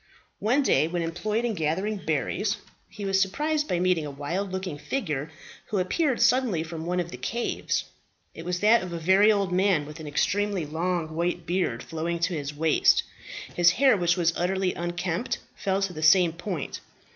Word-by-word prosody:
One 250 +7 +2
day 155 - +3
when 170 0 -2
employed 210 +8 -1
in 235 - 0
gathering 190 +5 -1
berries 190 +4 -1 0.3
he 205 -2 -7
was 195 0 +2
surprised 300 +10 0
by 175 - 0
meeting 180 -3 +2
a 150 - -4
wild 170 +8 -3
looking 185 -5 -4
figure, 155 - -3 0.4
who 210 - -2
appeared 255 - +1
suddenly 245 -10 +3
from 165 0 -6
one 180 +1 0
of 175 -1 -3
the - - -7
caves. 235 +1 -2 0.5
It 165 - -9
was 180 +1 -2
that 220 +3 +5
of 180 -1 -6
a - - -3
very 190 +6 +5
old 200 -3 0
man, 185 -4 +2
with 150 +2 -10
an 155 - -7
extremely 195 +4 0
long 165 +1 -2
white 175 +1 -1
beard 175 -9 -1
flowing 165 +1 -3
to 180 +1 +1
his 145 -3 -3
waist; 155 +1 +3 0.5
his 175 -1 +5
hair, 270 -4 +5
which 175 -2 +1
was 170 -1 +2
utterly 185 +1 0
unkempt, 175 +6 -2 0.2
fell 195 0 -1
to 190 -2 -2
the 155 - -6
same 165 +1 +5
point. 175 -3 -5
180 Hz, 185 wpm, -26 LUFS, 165-200 Hz, 0.5 s, that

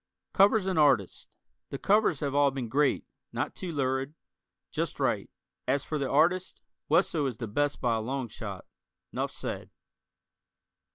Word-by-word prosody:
Covers 200 +1 +5
and 185 -4 +1
artists: 130 - +3 0.4
The 140 - -4
covers 200 -3 +3
have 140 -2 -1
all 145 0 +5
been 130 -4 -4
great. 145 +3 +2 0.3
Not - - -2
too 180 -2 -5
lurid. 135 0 -1 0.6
Just - - -3
right. - - 0 0.4
As 135 +2 +1
for 155 - -3
the 135 -2 -1
artists, 175 +6 +2 0.3
Wesso 160 -2 +3
is 125 -4 -4
the 115 - -4
best 145 +7 0
by 115 -2 +1
a - - -2
long 130 +2 -3
shot. 100 -4 -7 0.5
Nuff - - -2
said. - - -5
140 Hz, 155 wpm, -29 LUFS, 130-160 Hz, 0.6 s, Covers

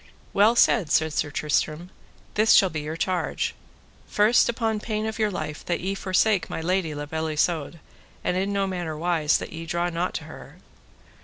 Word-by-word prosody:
Well 210 +4 +5
said, 215 -8 +3
said 160 -1 +2
Sir 150 - -1
Tristram, 155 +4 -1 0.4
this 215 +1 +4
shall 190 -2 +5
be 155 -1 -3
your 155 +2 -5
charge. 180 +1 -1 0.5
First, 215 +4 +4
upon 225 -2 -1
pain 215 0 -3
of 220 +1 -4
your 215 -1 +2
life 155 -5 -5
that 175 - 0
ye 190 +2 -2
forsake 195 -1 +1
my - - -4
lady 170 -2 -1
La 145 0 -4
Beale 160 +2 -3
Isoud, 160 +1 -1 0.4
and 180 - 0
in 195 +2 0
no 200 -1 +1
manner 175 -5 -4
wise 160 -2 +2
that - - -7
ye 165 0 -7
draw 175 +1 -1
not 175 +2 -2
to - - -3
her. - - -12
175 Hz, 185 wpm, -25 LUFS, 160-200 Hz, 0.5 s, Well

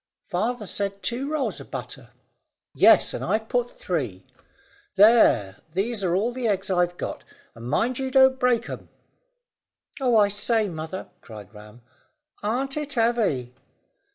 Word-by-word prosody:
"Father 215 +5 -2
said 200 0 -4
two 255 +4 -2
rolls 305 -3 -2
of - - -12
butter." - - -7 0.6
"Yes, - - +5
and - - -4
I've 220 0 -1
put 245 0 0
three. 125 - -4 0.7
There, 200 - +5 0.2
these 200 +3 -1
are 175 -1 +1
all 225 +6 0
the 250 -2 -2
eggs 195 -2 -1
I've 175 -1 +1
got, - - -5 0.3
and 115 0 -11
you - - -5
mind 245 - 0
you 265 0 -2
don't 265 0 +5
break 245 -2 +2
'em!" - - -8 1.1
"Oh, 250 -4 +3
I 205 -1 +5
say, 210 +2 0
mother," 160 +1 -6
cried 105 -2 -12
Ram, 105 +3 -14 0.6
"aren't 265 +7 -2
it 290 -2 -3
heavy!" 225 - 0
210 Hz, 150 wpm, -24 LUFS, 175-245 Hz, 1.1 s, Yes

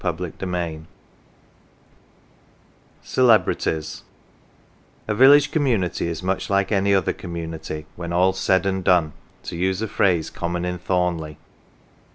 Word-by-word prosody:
45 85 -1 -4
CELEBRITIES 85 -4 -4 2.2
CELEBRITIES 110 -10 +1 1.1
A 105 - 0
VILLAGE 140 +6 +6
community 115 - 0
is 85 +1 -5
much 95 +1 -2
like 100 0 +1
any 100 -1 +2
other 95 -1 +2
com 85 -2 -8
munity 80 -2 -6
" - - -33
when 85 -1 -6
alPs 90 +2 +2
said 95 0 +2
and 95 -1 -1
done 90 -5 +3
" - - -33
(to - - -6
use 95 +2 -1
a 110 - -2
phrase 90 -5 +1
common 85 +1 -3
in 90 0 -3
Thornleigh). 90 -4 -1
90 Hz, 135 wpm, -22 LUFS, 85-95 Hz, 2.2 s, VILLAGE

